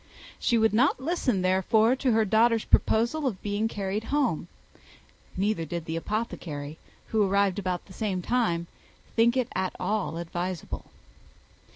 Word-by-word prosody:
She 235 - +2
would 220 -1 +3
not 250 +6 +3
listen, 260 - 0
therefore, 215 +6 +3
to 260 -1 +1
her 220 -1 +3
daughter's 225 +2 +3
proposal 245 +7 +2
of 205 -8 -3
being 205 +2 0
carried 205 0 -3
home; 270 - 0 0.9
neither 200 -2 0
did 165 +1 -5
the 160 - -3
apothecary, 160 -7 -4 0.3
who 220 - +2
arrived 200 0 +2
about 180 -2 -3
the 190 - -14
same 190 -3 -2
time, 195 -9 +1 0.5
think 235 +2 +4
it 255 -3 0
at 185 0 -2
all 205 -5 -1
advisable. 175 +1 -4
210 Hz, 145 wpm, -27 LUFS, 185-230 Hz, 0.9 s, think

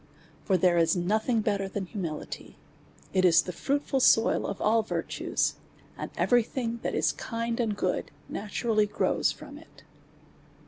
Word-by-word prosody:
For 190 - +3
there 175 -1 +3
is 165 +1 +3
nothing 215 +6 +1
better 200 -2 0
than 195 0 -4
humility; 175 -5 -6 0.6
it 185 -1 +3
is 170 -2 +6
the 180 - -5
fruitful 280 - -1
soil 225 -3 +4
of 200 - -4
all 225 +2 +3
virtues; 215 - -1 0.4
and - - -5
every 245 -1 +4
thing 235 0 -4
that - - -2
is - - +2
kind 230 0 -3
and 220 -4 0
good 185 -2 -1 0.2
naturally 215 +1 0
grows - - +1
from - - -10
it. - - -19
210 Hz, 150 wpm, -28 LUFS, 185-230 Hz, 0.6 s, is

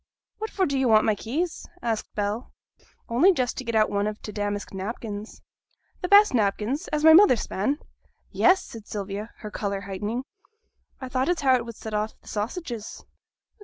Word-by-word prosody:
'What 440 +1 -3
for 380 - +1
do 280 -4 0
yo' 265 - +2
want 215 -2 +5
my 220 - +3
keys?' 300 - -3 0.2
asked 225 -2 -2
Bell. 210 +3 -2 0.6
'Only 260 +12 +5
just 255 -6 -1
to - - -4
get 230 -2 -3
out 215 -1 +3
one 205 0 0
of 215 0 -4
t' 210 - -7
damask 205 -1 -3
napkins.' 210 +2 -6 0.6
'The 360 - -1
best 405 -2 +7
napkins, 225 - 0
as 300 0 -1
my 320 0 +9
mother 375 -5 +8
span?' 220 +5 -1 0.5
'Yes!' 380 +1 +4
said 225 -2 -11
Sylvia, 205 +1 -5
her 210 - -7
colour 200 -2 -3
heightening. 205 +5 -4 0.8
'I 260 - -5
thought 260 +3 0
as 355 -3 +1
how 265 -2 +4
it 240 -2 -1
would 230 -1 -8
set 220 0 -8
off 210 +1 -2
t' - - -23
sausages.' 230 - -5
225 Hz, 185 wpm, -25 LUFS, 210-270 Hz, 0.8 s, my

